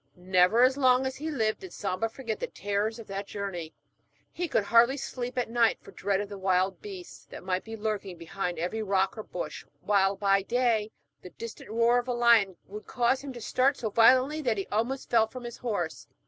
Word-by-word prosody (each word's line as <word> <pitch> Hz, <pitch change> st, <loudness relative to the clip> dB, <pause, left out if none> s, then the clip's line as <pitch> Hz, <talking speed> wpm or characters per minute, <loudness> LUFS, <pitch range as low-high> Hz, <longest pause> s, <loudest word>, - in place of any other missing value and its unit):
Never 185 Hz, +5 st, +3 dB
as 260 Hz, +2 st, +4 dB
long 255 Hz, -1 st, +4 dB
as 265 Hz, 0 st, -2 dB
he 310 Hz, +3 st, -4 dB
lived 220 Hz, -7 st, 0 dB
did 375 Hz, -2 st, -10 dB
Samba 200 Hz, +2 st, -2 dB
forget 225 Hz, -2 st, -5 dB
the -, -, -3 dB
terrors 205 Hz, +3 st, -2 dB
of 230 Hz, -, -9 dB
that 195 Hz, 0 st, -5 dB
journey. 185 Hz, -6 st, -5 dB, 0.6 s
He 350 Hz, 0 st, -3 dB
could 275 Hz, -, +1 dB
hardly 235 Hz, +6 st, +4 dB
sleep 250 Hz, -2 st, -5 dB
at 250 Hz, -, 0 dB
night 230 Hz, 0 st, +2 dB
for -, -, -14 dB
dread 195 Hz, +1 st, -1 dB
of 205 Hz, -, -5 dB
the 200 Hz, -1 st, -8 dB
wild 185 Hz, -1 st, +1 dB
beasts 190 Hz, -4 st, -10 dB
that -, -, -11 dB
might 185 Hz, 0 st, -1 dB
be 225 Hz, 0 st, -8 dB
lurking 205 Hz, -4 st, -3 dB
behind 180 Hz, +1 st, -4 dB
every 180 Hz, +7 st, -2 dB
rock 195 Hz, -2 st, +1 dB
or 220 Hz, -, -5 dB
bush, -, -, -6 dB, 0.2 s
while, 200 Hz, -1 st, +2 dB
by 195 Hz, 0 st, +2 dB
day, 230 Hz, -1 st, +1 dB, 0.3 s
the 180 Hz, -, -10 dB
distant 230 Hz, +2 st, -9 dB
roar 235 Hz, +2 st, +3 dB
of 245 Hz, -, -6 dB
a 250 Hz, -, 0 dB
lion 235 Hz, -6 st, +4 dB
would 210 Hz, +2 st, -10 dB
cause 250 Hz, +1 st, +1 dB
him 280 Hz, -, -6 dB
to 240 Hz, -, -9 dB
start 265 Hz, +5 st, +2 dB
so 220 Hz, -3 st, -3 dB
violently, 255 Hz, +7 st, +5 dB
that 240 Hz, -7 st, 0 dB
he 195 Hz, -, -2 dB
almost 235 Hz, +6 st, -2 dB
fell 225 Hz, -2 st, +4 dB
from 250 Hz, +2 st, -9 dB
his 240 Hz, 0 st, -7 dB
horse. 200 Hz, -9 st, -3 dB
220 Hz, 215 wpm, -28 LUFS, 195-245 Hz, 0.6 s, violently